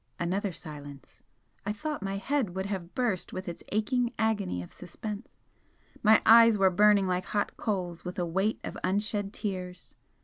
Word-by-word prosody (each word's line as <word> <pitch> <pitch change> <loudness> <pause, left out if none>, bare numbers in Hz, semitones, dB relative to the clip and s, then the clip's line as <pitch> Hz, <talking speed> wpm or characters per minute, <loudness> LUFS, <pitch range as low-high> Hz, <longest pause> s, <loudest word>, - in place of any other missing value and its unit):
Another 190 +3 -1
silence. 145 -4 -10 0.4
I 205 - -1
thought 300 +5 -4
my 195 0 -2
head 220 -3 -1
would 190 0 -2
have 190 -2 -5
burst 240 -9 -1
with 185 +1 -5
its 170 - -6
aching 240 +3 +1
agony 205 - 0
of - - -12
suspense, 205 +5 -7 0.7
my 220 0 +6
eyes 230 -1 +8
were 190 -1 +4
burning 205 +1 +5
like 185 0 -1
hot 205 -1 -1
coals 180 -6 -3
with 180 0 -6
a 175 - 0
weight 190 +6 0
of - - -6
unshed 205 +1 0
tears. 185 -5 -5
195 Hz, 165 wpm, -29 LUFS, 180-215 Hz, 0.7 s, eyes